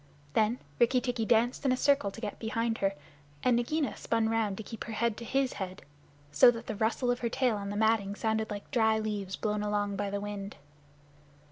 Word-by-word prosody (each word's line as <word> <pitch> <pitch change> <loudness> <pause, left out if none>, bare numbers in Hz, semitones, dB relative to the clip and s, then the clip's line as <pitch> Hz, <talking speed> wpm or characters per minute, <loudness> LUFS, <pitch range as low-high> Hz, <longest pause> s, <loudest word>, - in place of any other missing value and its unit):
Then 220 +2 +2 0.2
Rikki 250 +2 +4
tikki 245 -3 -1
danced 240 +3 +2
in 270 - +3
a 255 - +2
circle 280 -6 +3
to 195 - -10
get 210 -3 -5
behind 230 0 -1
her, 195 0 +1 0.5
and 250 - +4
Nagaina 255 +1 0
spun 225 -1 0
round 220 -3 0
to 220 - -5
keep 225 +1 -7
her 225 - -6
head 230 0 0
to - - -7
his 270 +2 0
head, 185 -1 -6 0.5
so 195 - +8
that 235 -1 -2
the 220 - -4
rustle 230 +4 +1
of 245 - -1
her 235 - -1
tail 250 -2 +1
on 200 -1 -4
the 205 - -3
matting 220 -2 +2
sounded 220 0 -1
like 205 -1 -7
dry 220 -4 +3
leaves 210 -3 -3
blown 210 -1 -1
along 205 -1 -1
by 205 0 -1
the 200 0 -2
wind. 205 -1 -5
220 Hz, 215 wpm, -30 LUFS, 205-240 Hz, 0.5 s, so